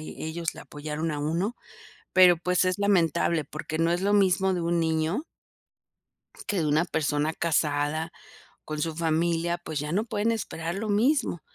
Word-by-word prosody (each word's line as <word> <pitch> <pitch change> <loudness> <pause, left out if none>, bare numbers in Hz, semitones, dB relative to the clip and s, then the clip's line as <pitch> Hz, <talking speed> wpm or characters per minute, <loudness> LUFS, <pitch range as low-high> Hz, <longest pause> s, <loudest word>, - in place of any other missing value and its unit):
ellos 160 +2 -5
le - - -10
apoyaron 150 +2 -4
a 150 - -3
uno, 170 +10 -1 0.6
pero, 180 -2 +8
pues 180 +2 +1
es 185 +2 0
lamentable, 170 -5 +2
porque 155 +2 -6
no 165 +1 +2
es 175 - 0
lo 200 +2 +1
mismo 190 -1 +3
de 175 - -2
un 170 0 +1
niño 160 - 0 1.2
que 205 - -1
de 155 - 0
una 155 +4 +2
persona 155 -1 0
casada, 155 0 0 0.5
con 155 0 -4
su 160 -1 -2
familia, 170 +1 0
pues, 155 -4 -5
ya 150 +1 -4
no 210 +5 0
pueden 215 +1 0
esperar 170 -6 -3
lo 215 +2 -3
mismo. 225 - +1
170 Hz, 165 wpm, -27 LUFS, 155-185 Hz, 1.2 s, pero